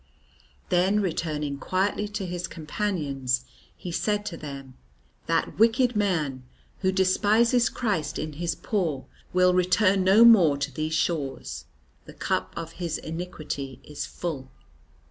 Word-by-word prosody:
Then 185 +4 +3
returning 155 -6 -2
quietly 200 +4 0
to 205 -1 -4
his 175 0 -3
companions 145 -8 -2 0.3
he 180 - -6
said 210 +4 0
to 175 - -4
them, 140 -4 -8 0.5
"That - - 0
wicked 235 +2 +4
man 160 -11 0 0.4
who 190 -1 +2
despises 215 +6 +3
Christ 210 -11 -2
in 155 -1 -4
His 165 +1 -2
poor 165 - -2 0.3
will 180 0 +4
return 185 +2 +3
no 200 +5 +7
more 180 -11 +7
to 140 - -3
these 155 0 -2
shores. 155 -5 -2 0.4
The - - -12
cup - - -2
of 165 -1 -5
his 170 -2 -1
iniquity 155 -5 -6
is 150 - -6
full." 145 -7 -5
175 Hz, 130 wpm, -26 LUFS, 150-205 Hz, 0.5 s, no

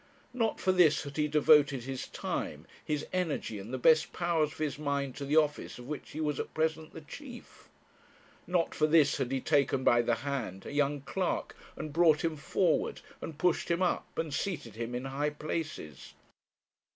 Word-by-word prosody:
Not 225 -3 0
for 190 - +2
this 175 -5 +4
had 140 +1 -8
he 150 -1 +2
devoted 145 -3 +4
his 130 0 -5
time, - - -4 0.2
his 150 -1 -2
energy, 160 - -1
and 100 +5 -8
the 130 - -2
best 155 +5 +4
powers 165 -3 +1
of 160 - -13
his 150 -2 -2
mind 140 -3 -1
to 140 - -4
the 145 +2 0
office 150 -2 +1
of 125 - -10
which 150 0 -6
he 155 - -7
was 150 -3 -1
at - - -5
present 160 0 -1
the 160 - -8
chief; 245 - -11 0.8
not 175 -2 +1
for 155 - +2
this 155 -2 +4
had 130 - -2
he 135 - +1
taken 140 -1 +2
by 120 -1 +5
the 120 0 +1
hand 115 -10 -3
a - - -6
young 145 0 +1
clerk, 185 +6 -2 0.2
and 155 - -6
brought 165 -1 +4
him 165 -1 0
forward, 165 +4 0 0.2
and 160 - -6
pushed 180 +2 +1
him 170 +2 +2
up, 180 - -1
and 160 -3 -2
seated 140 - -3
him 115 +2 -4
in 125 +2 -3
high 140 +2 -1
places. 150 - -5
150 Hz, 190 wpm, -31 LUFS, 135-160 Hz, 0.8 s, by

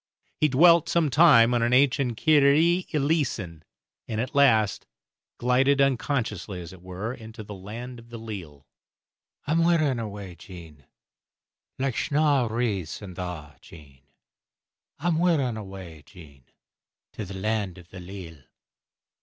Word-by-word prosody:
He 155 - +4
dwelt 165 +4 +5
some 165 -4 +1
time 130 -6 +6
on 120 - +1
an 120 +1 +1
ancient 130 -2 +2
"Kyrie 155 +5 +3
Eleeson," 135 - -1 0.5
and 110 - -3
at 125 +4 -3
last 115 -8 +3 0.5
glided, 130 +3 +2
unconsciously 120 - -1
as 85 0 -9
it 90 - -14
were, 95 +6 -5
into 110 -2 -10
the 105 0 -9
"Land 115 +6 -8
o' - - -13
the 120 0 -9
Leal." 90 -11 -9 0.8
I'm 165 +3 +2
wearin' 155 -7 +2
away, 100 -4 -7
Jean, 80 - -13 0.9
Like 130 -2 -1
snaw 145 -4 +2
wreaths 105 -7 -2
in 95 -3 -8
thaw, 85 -6 -7
Jean, 70 -5 -16 1.0
I'm 160 +2 0
wearin' 150 -9 +1
awa, 95 -7 -9
Jean, 70 - -16 0.7
To 110 - -6
the 95 0 -8
Land 100 -2 -2
o' 90 - -12
the 90 +3 -12
Leal. 90 -4 -10
115 Hz, 135 wpm, -25 LUFS, 90-140 Hz, 1.0 s, time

